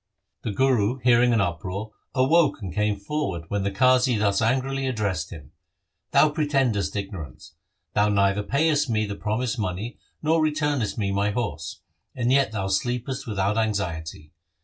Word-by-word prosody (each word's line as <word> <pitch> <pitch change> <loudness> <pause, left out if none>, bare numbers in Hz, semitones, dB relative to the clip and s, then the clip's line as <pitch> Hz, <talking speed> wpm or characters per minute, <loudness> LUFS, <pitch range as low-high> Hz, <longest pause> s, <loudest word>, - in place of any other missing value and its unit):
The - - -3
Guru, 125 0 +2
hearing 120 0 +5
an 115 -3 +3
uproar, 95 +4 -3 0.2
awoke 145 +4 +3
and 95 -6 -6
came 105 +1 0
forward, 100 - -3
when 100 -1 -1
the 100 - 0
Qazi 125 +3 +3
thus 100 0 +1
angrily 135 +3 0
addressed 100 -9 -1
him: 75 -4 -11 0.3
' 95 +2 -54
Thou 145 +2 +5
pretendest 135 - 0
ignorance. 95 -11 -7 0.4
Thou 105 0 +3
neither 100 0 +2
payest 145 +4 +1
me 110 -1 +1
the 100 - -4
promised 115 +4 -2
money 105 +4 -4 0.2
nor 160 +1 +3
returnest 150 -7 0
me 100 -3 -1
my 100 +1 +1
horse, 90 -7 -4 0.3
and 125 0 0
yet 135 -3 +3
thou 100 -3 -2
sleepest 120 +7 -2
without 105 0 0
anxiety. 85 -8 -3
110 Hz, 155 wpm, -25 LUFS, 100-130 Hz, 0.4 s, hearing